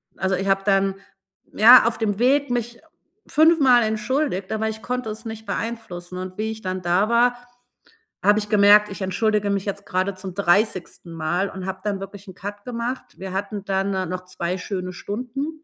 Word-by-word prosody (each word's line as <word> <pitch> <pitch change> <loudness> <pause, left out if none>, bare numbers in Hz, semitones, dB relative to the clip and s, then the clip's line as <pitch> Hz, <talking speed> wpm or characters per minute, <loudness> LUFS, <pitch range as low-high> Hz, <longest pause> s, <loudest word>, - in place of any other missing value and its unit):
Also, 190 0 0
ich 190 +2 -3
habe 195 0 +2
dann, 195 -1 +2 0.6
ja, 235 +2 +8
auf 235 - -1
dem 210 -2 -1
Weg 275 +2 +3
mich 240 -1 -3 0.5
fünfmal 295 -7 +5
entschuldigt, 220 -1 -1
aber 220 0 -1
ich 220 0 -7
konnte 250 -2 -3
es 220 +2 -8
nicht 220 0 -7
beeinflussen 200 -5 -5
und 185 +1 -7
wie 220 +1 -2
ich 220 0 -8
dann 185 0 -3
da 180 +5 +1
war, 245 +1 +3 0.9
habe 205 +2 +5
ich 210 0 -6
gemerkt: 210 0 +6
„Ich 195 - -8
entschuldige 205 +2 0
mich 200 0 -1
jetzt 200 0 -5
gerade 185 +2 -1
zum 185 -1 -8
30. 185 -2 0
Mal“, 175 +4 -1
und 190 -1 -7
habe 190 0 -4
dann 200 -2 -2
wirklich 195 +1 -9
'n 185 - -10
Cut 205 +1 -8
gemacht. 245 +1 -3
Wir 190 0 -7
hatten 200 +1 -4
dann, 195 0 0
äh, 190 -1 -1
noch 185 +1 -5
2 180 0 -3
schöne 185 -1 -5
Stunden 265 - -5
205 Hz, 190 wpm, -22 LUFS, 190-225 Hz, 0.9 s, ja